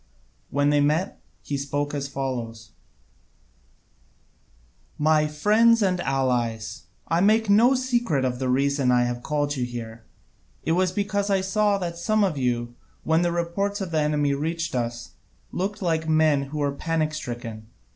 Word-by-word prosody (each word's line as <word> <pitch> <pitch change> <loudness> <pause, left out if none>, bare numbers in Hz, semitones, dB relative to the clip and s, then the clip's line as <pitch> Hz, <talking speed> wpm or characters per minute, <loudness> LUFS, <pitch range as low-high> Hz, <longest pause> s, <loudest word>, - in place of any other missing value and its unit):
When 145 +1 +2
they 145 0 +3
met, 155 +7 0 0.2
he 145 - -3
spoke 145 +1 -2
as 140 -1 -2
follows: 120 -5 -5 2.3
"My 155 0 +3
friends 215 +9 +4
and 185 -2 +1
allies, 125 -5 -1 0.2
I 165 +1 +1
make 215 +1 +3
no 235 +6 +5
secret 240 - 0
of 125 -1 -2
the 130 -1 -1
reason 140 0 +1
I 125 -1 +4
have 120 0 -2
called 145 +1 -1
you 130 - -2
here. 115 -2 -6 0.6
It - - -1
was 180 +2 +2
because 200 +1 -1
I 195 -1 +2
saw 205 +1 +1
that 170 -3 -4
some 215 +4 +2
of 185 -6 +1
you, 120 -3 -1 0.3
when 160 +1 +2
the 175 -1 +1
reports 175 +4 -1
of 190 -4 -4
the 160 - +1
enemy 150 -1 +1
reached 165 +4 -2
us, 120 -1 -3 0.4
looked 200 +2 -3
like 160 -2 0
men 155 -3 +3
who 145 +3 -7
were 145 -1 0
panic 155 +1 -1
stricken. 120 -6 -6
150 Hz, 155 wpm, -24 LUFS, 130-185 Hz, 2.3 s, no